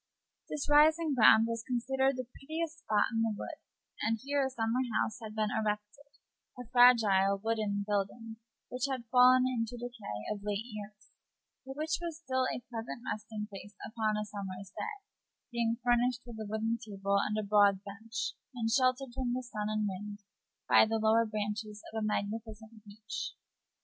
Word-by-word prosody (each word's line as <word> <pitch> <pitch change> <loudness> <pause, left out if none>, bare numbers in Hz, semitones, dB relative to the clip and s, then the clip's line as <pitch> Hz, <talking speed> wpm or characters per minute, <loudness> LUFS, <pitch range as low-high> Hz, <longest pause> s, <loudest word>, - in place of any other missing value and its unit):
The - - -3
rising 305 +1 +5
ground 225 -2 +7
was 230 -1 -2
considered 265 +3 0
the 255 - -3
prettiest 320 +2 -4
spot 215 -6 +1
in 225 - +1
the 225 -2 +1
wood, - - -7 0.4
and 225 0 +1
here 285 0 +1
a 265 - 0
summer 235 0 0 0.2
house 215 - -1
had 215 -1 -7
been 215 -1 0
erected 210 +6 -3 0.5
a 250 - -7
fragile 215 -6 +6
wooden 210 -1 -1
building, 210 +3 -2 0.3
which 250 +2 -1
had 255 -3 -3
fallen 255 0 +7
into 245 -2 -1
decay 230 - -6
of 205 - -9
late 205 +1 -2
years, 210 -3 -10 0.6
but 270 +1 -7
which 315 +2 -1
was 335 -3 -4
still 260 -5 0
a 245 - -6
pleasant 235 0 -6
resting 215 0 -6
place 205 0 -10
upon 220 -1 -1
a 210 - -2
summer's 195 -2 -7
day, 420 -2 -5 0.5
being 235 -1 0
furnished 245 +1 +2
with 235 -2 -9
a 215 -1 -5
wooden 225 +2 -1
table 200 -2 0
and 210 - -1
a 215 - -1
broad 200 -1 +4
bench, 220 +5 -5 0.2
and 225 -2 -1
sheltered 255 0 +2
from 250 -1 -1
the 255 +1 -2
sun 215 -4 -4
and 215 -1 0
wind 205 +2 -6 0.4
by - - +7
the 225 0 +1
lower 220 +1 +3
branches 210 0 -4
of 220 -1 -2
a - - 0
magnificent 220 +1 -4
beech. 220 +2 -6
225 Hz, 170 wpm, -32 LUFS, 210-250 Hz, 0.6 s, ground